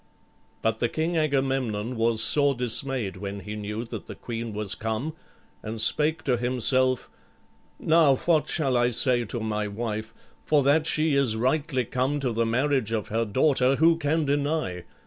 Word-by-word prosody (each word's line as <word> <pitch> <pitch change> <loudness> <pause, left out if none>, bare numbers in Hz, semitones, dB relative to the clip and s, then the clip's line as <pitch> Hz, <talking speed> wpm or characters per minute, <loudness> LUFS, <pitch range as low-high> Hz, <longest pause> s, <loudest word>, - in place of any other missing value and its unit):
But 110 0 0
the 120 - 0
King 160 +5 -2
Agamemnon 135 -7 -1
was 115 -1 +2
sore 140 +4 +3
dismayed 125 -3 -2
when 100 +1 -6
he 105 +2 -7
knew 105 +2 -5
that - - -8
the - - -8
queen 115 -1 -6
was 105 -1 -1
come, 110 +8 -3 0.5
and 110 +1 -6
spake 150 +7 +2
to 125 -3 +1
himself, 130 +1 +2 0.7
"Now 160 -4 +4
what 160 +2 +1
shall 135 -6 0
I 120 0 +2
say 120 0 +2
to 120 +3 -4
my 105 -1 -2
wife? 110 +1 -5 0.3
For 150 -2 +2
that 155 +4 +3
she 155 -1 +1
is 135 -5 +3
rightly 130 +2 0
come 130 +5 -1
to 130 -3 -1
the 115 0 0
marriage 130 -1 0
of 110 -3 -2
her 115 +2 0
daughter, 130 +4 +2
who 165 +3 +4
can 155 0 0
deny? 140 - -1
125 Hz, 165 wpm, -25 LUFS, 110-145 Hz, 0.7 s, Now